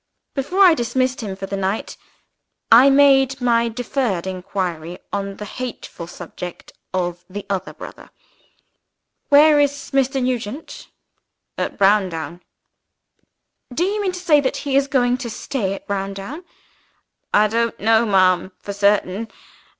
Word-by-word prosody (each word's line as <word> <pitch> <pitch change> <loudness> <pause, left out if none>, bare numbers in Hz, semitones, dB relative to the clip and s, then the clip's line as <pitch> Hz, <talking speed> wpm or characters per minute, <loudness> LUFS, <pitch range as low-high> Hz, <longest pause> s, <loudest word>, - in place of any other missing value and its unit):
Before 355 +8 +2
I 360 -3 +8
dismissed 255 -1 -1
him 200 -4 -5
for 195 - -6
the 195 - -4
night, 195 +2 -2 0.8
I 245 +4 +8
made 270 -1 +4
my 235 -2 +2
deferred 235 -5 -2
inquiry 180 -3 -4 0.2
on 200 -1 -3
the 210 - -6
hateful 230 -7 -7
subject 175 0 -9 0.2
of 175 -1 -2
the 205 +2 -7
other 190 -1 -2
brother. - - -11 1.2
"Where 295 +1 +7
is 285 0 0
Mr. 270 0 +1
Nugent?" 250 +2 -4 0.7
"At - - -3
Browndown." 185 -4 +1 1.3
"Do 285 +8 0
you 410 +3 0
mean 380 -2 -1
to 360 - -5
say 315 -5 +4
that 260 - -1
he 275 -2 -2
is 275 0 +3
going 250 -3 +2
to 245 -3 -5
stay 215 -3 -3
at - - -12
Browndown?" 200 - -5 0.9
"I 210 +1 +4
don't 230 +2 -1
know, 225 +2 +4
ma'am, 185 -1 +3
for 200 - -6
certain. 200 +1 +1
225 Hz, 135 wpm, -20 LUFS, 195-270 Hz, 1.3 s, I